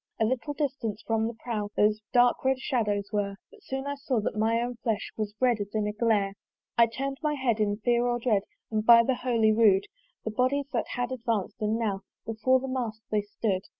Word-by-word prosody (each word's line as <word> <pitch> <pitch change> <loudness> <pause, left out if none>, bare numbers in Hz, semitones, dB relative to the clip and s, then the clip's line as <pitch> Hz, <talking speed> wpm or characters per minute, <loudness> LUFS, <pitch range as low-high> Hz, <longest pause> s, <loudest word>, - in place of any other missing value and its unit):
A 220 - +3
little 260 +5 -2
distance 260 -7 -3
from 225 0 +1
the 230 - -5
prow 225 -3 -3
Those 210 +1 +3
dark 245 -1 +4
red 265 0 +2
shadows 210 -7 -1
were; 200 -1 -1 0.2
But 450 -2 -18
soon 270 -6 -4
I 285 - -2
saw 275 -4 -1
that 210 - -2
my 225 +2 +2
own 240 0 -3
flesh 220 -3 -2
Was 210 -1 -3
red 245 -3 +3
as 205 +1 -6
in 215 -1 +1
a 210 - -2
glare. 210 -3 +1 0.4
I 235 0 +6
turn'd 270 +4 -4
my 300 -1 0
head 245 -5 0
in 205 -1 +1
fear 240 +2 +2
and 240 0 0
dread, 225 -4 +2 0.3
And 215 -1 0
by 230 +1 +8
the 260 - +1
holy 235 -3 +2
rood, 210 -3 +4 0.4
The 220 - -1
bodies 270 +5 0
had 245 +1 -2
advanc'd, 230 -6 -2
and 215 +1 +1
now 205 -4 -1 0.2
Before 225 +4 +2
the 265 - -5
mast 235 -4 -3
they 210 -1 +2
stood. 205 -2 -2
230 Hz, 215 wpm, -28 LUFS, 215-255 Hz, 0.4 s, by